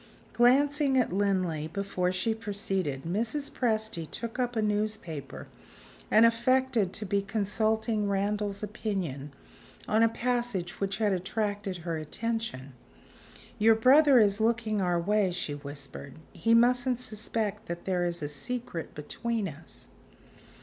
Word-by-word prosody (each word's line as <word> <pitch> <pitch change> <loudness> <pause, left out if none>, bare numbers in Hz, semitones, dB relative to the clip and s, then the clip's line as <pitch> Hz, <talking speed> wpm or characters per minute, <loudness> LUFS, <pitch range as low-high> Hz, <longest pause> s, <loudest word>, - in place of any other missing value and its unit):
Glancing 275 +3 +4
at 245 -8 +2
Linley 185 -6 0
before 185 0 -1
she 185 +5 0
proceeded, 195 -10 -3
Mrs. 230 - -2
Presty 220 - -1
took 230 +7 -5
up 245 -1 -1
a 220 - +1
newspaper, 210 -8 -3 0.6
and 220 +2 +6
affected 235 -3 +2
to 215 - -4
be 200 +1 +1
consulting 215 +1 0
Randal's 200 +1 -1
opinion 190 - -4 0.6
on 220 +1 +3
a 230 - +5
passage 235 -7 -2
which 195 0 -1
had 210 -3 +2
attracted 200 +1 -2
her 165 -2 -1
attention. 155 - -4 0.9
"Your 220 +1 +6
brother 270 +4 +6
is 210 -2 +4
looking 220 -2 +1
our 175 -2 +1
way," 205 +2 +2
she 175 -4 -3
whispered: 140 -1 -8 0.2
"he 230 0 +2
mustn't 245 +1 +3
suspect 215 -2 -3
that 170 0 -6
there 180 -2 0
is 175 -2 -1
a - - -1
secret 165 - -5
between 220 +8 -2
us." 145 -5 -11
210 Hz, 130 wpm, -29 LUFS, 180-230 Hz, 0.9 s, and